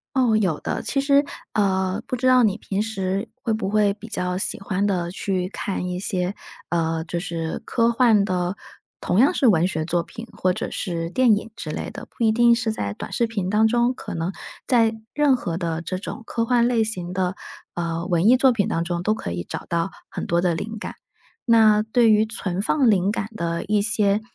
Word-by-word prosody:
哦， 245 -5 +3
有 185 -8 +1
的。 - - -3
其 275 - -1
实， 280 +1 +4 0.3
呃， 190 0 0
不 255 - -2
知 255 - -1
道 255 -1 +6
你 210 -2 +2
平 200 +1 -2
时 195 -1 -2
会 230 - 0
不 215 -3 -2
会 205 -1 +3
比 220 +2 -11
较 180 -3 -2
喜 195 - -2
欢 195 0 -1
地 175 -3 -1
去 185 -1 -2
看 190 -3 -3
一 180 0 -3
些 185 0 -2 0.4
呃， 165 -1 0
就 170 0 -3
是 165 -3 -3
科 230 -1 +2
幻 230 -4 +4
的， 180 0 -1 0.4
同 185 - 0
样 275 - +5
是 265 - +2
文 180 -4 +4
学 160 -3 -2
作 175 +1 0
品 230 +7 -10
或 185 - +1
者 - - -4
是 170 -2 -3
电 240 -2 +4
影 220 +2 -5
之 - - -6
类 - - -4
的？ - - -9
不 235 - -4
一 220 - +4
定 235 +1 +5
是 230 -1 -1
在 100 - -3
短 - - -8
视 235 - +1
频 205 -5 -3
当 215 +2 +4
中， 240 +2 +2
可 - - -7
能 170 +3 -2 0.3
在 230 -3 +3 0.2
任 290 -3 +4
何 170 -8 -4
的 165 -2 -2
这 185 +2 -4
种 230 +4 -7
科 230 - -1
幻 240 0 +3
类 235 -2 +2
型 180 -5 -4
的， 185 0 -1 0.4
呃， 170 0 -3
文 175 0 +2
艺 255 - +7
作 265 +1 +5
品 210 -5 0
当 165 - 0
中 170 0 -2
都 215 +4 +1
可 90 - -5
以 85 0 -4
找 - - -6
到 170 +2 0 0.2
很 - - -5
多 170 0 +2
的 175 -2 +1
灵 220 +6 -5
感。 - - -6 0.5
那 220 -3 +5
对 225 +1 +3
于 215 +1 +4
存 195 -5 -3
放 250 +3 +3
灵 195 -1 +2
感 205 -1 -3
的 170 -2 -2
一 210 0 +1
些， 205 -1 +2
200 Hz, 235 characters per minute, -23 LUFS, 180-225 Hz, 0.5 s, 艺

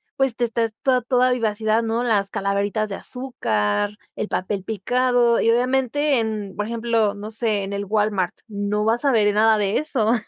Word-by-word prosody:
pues, 270 -3 0
te 240 - +1
estás 230 -1 -1
toda 255 -2 +2
toda 250 +1 +2
vivacidad, 220 -1 0
¿no? 230 +2 -1
Las 205 -5 +1
calaveritas 200 +2 -1
de 195 - -5
azúcar, 200 - -2 0.2
el - - -4
papel 190 +1 -2
picado 240 +3 +1
y, 230 - +3
obviamente, 265 +3 +1
en, 215 -3 -4
por 210 +1 -3
ejemplo, 230 -3 0
no 210 +2 -7
sé, 215 -3 -1
en 195 +1 -5
el 200 0 -2
Walmart 205 -3 0
no 210 0 -2
vas 230 +4 +1
a 280 - +3
ver 210 -3 +3
nada 220 +1 +4
de 205 -1 +1
eso. 240 -7 0
220 Hz, 180 wpm, -22 LUFS, 205-240 Hz, 0.2 s, nada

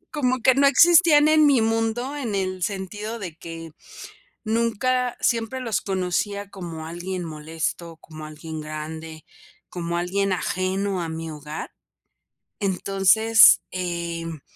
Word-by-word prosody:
Como 255 -3 +1
que 260 +2 +4
no 280 +1 +4
existían 325 0 +6
en 310 0 +5
mi 280 -4 +5
mundo, 225 +4 -1
en 240 -8 -3
el 185 -1 -2
sentido 205 +4 -4
de 180 -6 -7
que 165 -1 -9 0.7
nunca 235 +3 0
siempre 235 +2 0
los 235 -4 -2
conocía 195 +2 -2
como 170 -5 -8
alguien 175 +2 -5
molesto, 160 +1 -5
como 155 -1 -12
alguien 155 +1 -8
grande, 155 +1 -7 0.4
como 170 -1 -4
alguien 195 +3 -1
ajeno 185 +1 -2
a 165 - -4
mi 160 0 -5
hogar. 150 +1 -7 0.9
Entonces, 200 +3 +5
em, 170 -3 -4
190 Hz, 125 wpm, -23 LUFS, 165-225 Hz, 0.9 s, existían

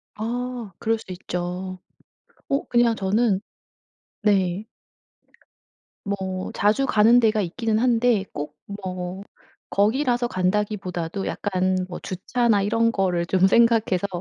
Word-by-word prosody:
아 240 0 -4
그럴 225 +1 +1
수 220 - -13
있죠. 180 +1 -4 0.7
어 275 - 0
그냥 240 -1 +3
저는 200 +1 +1 0.8
네. 195 -2 +2 1.4
뭐 190 -2 -3
자주 215 +7 +2
가는 225 +3 +5
데가 220 -2 +3
있기는 215 +4 -1
한데 240 -3 +3
꼭 150 0 -5 0.3
뭐 185 0 -5 0.5
거기라서 240 +4 +2
간다기보다도 190 -3 -2
약간 185 -2 0
뭐 175 - -6
주차나 215 +3 0
이런 230 +3 +2
거를 180 -5 0
좀 190 +1 +3
생각해서 225 -3 +3
205 Hz, 215 characters per minute, -23 LUFS, 185-230 Hz, 1.4 s, 가는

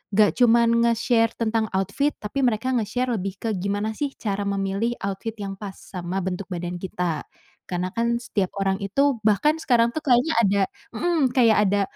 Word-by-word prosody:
nggak 210 -1 +5
cuman 235 -1 +5 0.2
nge-share 230 0 +2
tentang 225 -1 0
outfit 200 +10 0
tapi 215 +6 -3
mereka 240 +2 0
nge-share 245 +3 -1
lebih 195 -2 -2
ke 225 - -1
gimana 205 +3 -1
sih 285 -2 -2
cara 205 -2 -2
memilih 200 +4 -1
outfit 200 +3 -4
yang 195 -1 -4
pas 200 -2 -7
sama 185 +1 -5
bentuk 185 +1 -3
badan 175 0 -4
kita, 175 -4 -3 0.4
karena 180 0 -2
kan 235 +1 +1
setiap 200 -5 -2
orang 195 0 +1
itu 275 +6 +2
bahkan 295 +10 +3
sekarang 235 -4 +3
tuh 315 - -2
kayaknya 255 +4 +3
ada, 200 -1 +3 0.3
mhm, 300 -1 +1
kayak 230 -4 +5
ada, 200 0 +2
215 Hz, 170 wpm, -24 LUFS, 195-240 Hz, 0.4 s, nggak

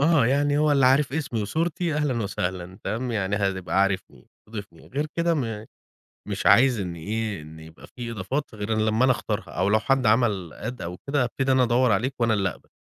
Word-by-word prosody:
آه، 145 -5 +4
يعني 145 +2 +2
هو 150 -1 +3
اللي 135 -3 +4
عارف 135 +1 +3
اسمي 135 -8 -2
وصورتي 165 - -1
أهلًا 140 -7 0
وسهلًا، 95 -2 -4
تمام، 120 +3 -2
يعني 100 -1 0
هتبقى 95 -1 0
عارفني، 95 -10 -3 0.2
ضيفني. 100 -7 -9
غير 145 +4 -2
كدة 170 +2 0
م 115 -6 -3 0.6
مش - - -4
عايز 125 -2 +6
إن 90 -3 -4
إيه، 105 +1 -3
إن 80 +1 -12
يبقى 80 +1 -13
في 120 -2 -7
إضافات 120 +8 -3
غير 105 +1 -4
لمّا 110 +3 +2
أنا 130 - +5
أختارها، 110 -2 -3
أو 95 +3 0
لو 110 +1 +4
حد 135 +1 +1
عمل 105 -7 +2
add 125 +3 -5
أو 90 +1 -5
كدة، 140 -2 +2
أبتدي 130 +2 -1
أنا 130 -1 +4
أدوّر 120 0 +3
عليك 120 +7 +1
وأنا 115 -2 +3
اللي 95 -2 +1
أقبل. - - -13
115 Hz, 200 wpm, -25 LUFS, 100-135 Hz, 0.6 s, عايز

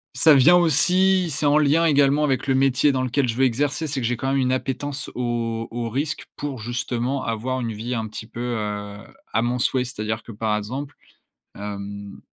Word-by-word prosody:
ça 160 -2 +6
vient 145 +6 +7
aussi, 180 +2 +3
c'est 150 +1 -1
en 145 +1 +4
lien 155 +3 +3
également 145 -1 +3
avec 135 -2 0
le 135 - +2
métier 135 +2 +3
dans 130 -1 -1
lequel 130 +1 0
je 115 - -2
veux 130 +2 +3
exercer. 140 +5 0
C'est 140 -2 -2
que 115 - 0
j'ai 125 - -1
quand 135 +3 -2
même 135 - +1
une 130 -1 +1
appétence 135 +2 -3
au 115 -2 -2
au 120 0 -4
risque 145 +6 -3
pour 140 -4 -5
justement 120 +3 -2
avoir 120 +3 -2
une 115 -2 -3
vie 115 +4 -4
un 110 -2 -2
petit 110 +1 -8
peu, 115 - -10 0.2
heu, 105 -1 -4 0.4
à 115 - +2
mon 120 +1 -1
souhait. 130 +1 +1
C'est-à-dire 110 -3 -4
que - - -10
par 105 0 -1
exemple, 130 +7 -5 0.6
hem, 100 0 -7
130 Hz, 205 wpm, -23 LUFS, 115-140 Hz, 0.6 s, vient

